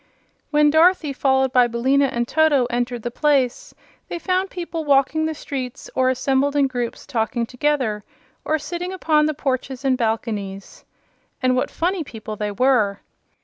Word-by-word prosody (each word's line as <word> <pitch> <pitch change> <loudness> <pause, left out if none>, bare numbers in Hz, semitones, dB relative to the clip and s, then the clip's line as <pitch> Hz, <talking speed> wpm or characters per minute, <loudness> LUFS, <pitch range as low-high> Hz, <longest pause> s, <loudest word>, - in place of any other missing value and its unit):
When 295 -1 +4
Dorothy, 320 -2 +4
followed 265 -1 +1
by 250 -1 +5
Billina 260 +4 +2
and 240 -2 -2
Toto, 310 -4 +3
entered 240 -1 -2
the 240 - -3
place, 270 -2 +1 0.4
they - - -4
found 370 +2 -1
people 340 -2 -5
walking 290 +2 +2
the 315 - -3
streets 260 -4 -6
or 255 0 +2
assembled 270 +2 +1
in 285 -1 +4
groups 245 -3 -4
talking 235 -2 -1
together, 250 -5 -1 0.4
or 315 - +1
sitting 350 +4 -5
upon 310 -5 +2
the 310 - -2
porches 265 -1 -3
and 265 -1 +3
balconies. 220 -4 -3 0.6
And 255 0 +3
what 255 - 0
funny 355 +1 -1
people 220 -5 -8
they 210 0 -3
were! 210 -3 +2
265 Hz, 155 wpm, -21 LUFS, 240-300 Hz, 0.6 s, by